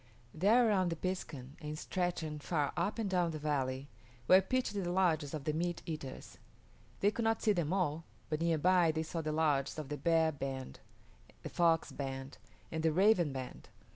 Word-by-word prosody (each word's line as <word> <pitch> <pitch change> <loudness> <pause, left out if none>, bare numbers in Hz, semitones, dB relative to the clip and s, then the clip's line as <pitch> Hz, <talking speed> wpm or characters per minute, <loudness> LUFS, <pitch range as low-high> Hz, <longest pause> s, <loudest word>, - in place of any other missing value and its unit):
There 220 +9 +4
around 190 -4 +2
the 165 - -2
piskun, 155 -6 -5
and 150 0 -5
stretching 170 -4 -2
far 145 -1 -1
up 175 +6 -1
and 225 -3 -1
down 180 -3 +1
the 160 - -4
valley, 140 -3 -1 0.4
were 185 +1 +8
pitched 255 +3 -1
the 195 -4 -2
lodges 165 -6 +2
of 150 -3 -5
the 155 - -1
meat 175 +2 -2
eaters. 155 -5 -7 0.6
They 205 - +4
could 235 - -3
not 225 0 +1
see 215 - +4
them 170 -4 -1
all, 165 -4 0 0.2
but 155 0 -2
near 165 -1 +2
by 175 +1 +4
they 160 0 -2
saw 165 +1 -4
the 155 -1 -2
lodges 150 -3 +1
of 150 -3 -5
the 150 - -3
Bear 165 -1 +3
band, 135 -2 -5 0.6
the - - -5
Fox 165 -2 +2
band, 135 -3 -6 0.3
and 160 - -2
the 160 0 +3
Raven 180 -2 +4
band. 130 -1 -7
160 Hz, 190 wpm, -34 LUFS, 150-185 Hz, 0.6 s, were